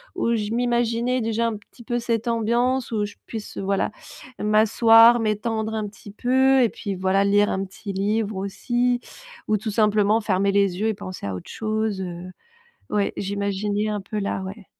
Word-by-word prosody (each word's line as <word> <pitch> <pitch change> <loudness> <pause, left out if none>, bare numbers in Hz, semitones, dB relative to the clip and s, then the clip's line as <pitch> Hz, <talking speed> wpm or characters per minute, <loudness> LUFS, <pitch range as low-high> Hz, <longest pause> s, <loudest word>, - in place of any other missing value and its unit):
où 235 -10 +1
je 210 -1 -2
m'imaginais 240 +1 +1
déjà 225 +1 0
un 220 - -3
petit 210 +3 -17
peu 240 +1 -1
cette 230 0 -2
ambiance 240 +3 0
où 210 -1 0
je 205 - -9
puisse, 220 -2 -7
voilà, 195 +1 0 0.5
m'asseoir, 225 +2 +6
m'étendre 220 0 -1
un 215 -1 -2
petit 205 0 -12
peu 260 +4 +3
et 235 - +3
puis, 200 -2 -5
voilà, 190 +1 +2
lire 205 +1 +3
un 190 +1 -1
petit 195 +1 -8
livre 210 +2 -1
aussi 240 +5 0 0.5
ou 215 - +3
tout 215 +2 -4
simplement 210 0 +3
fermer 200 -2 +1
les 200 -2 +2
yeux 220 - +1
et 220 - +1
penser 185 - -7
à 95 - -3
autre 90 - -9
chose, 215 -2 -2
heu. 180 0 -6 0.6
Ouais, 205 -1 0
j'imaginais 200 +1 -1
un 210 -1 -2
peu, 210 +2 -4
là, 200 -1 -2
ouais. 195 +2 -8
215 Hz, 180 wpm, -23 LUFS, 200-230 Hz, 0.6 s, m'asseoir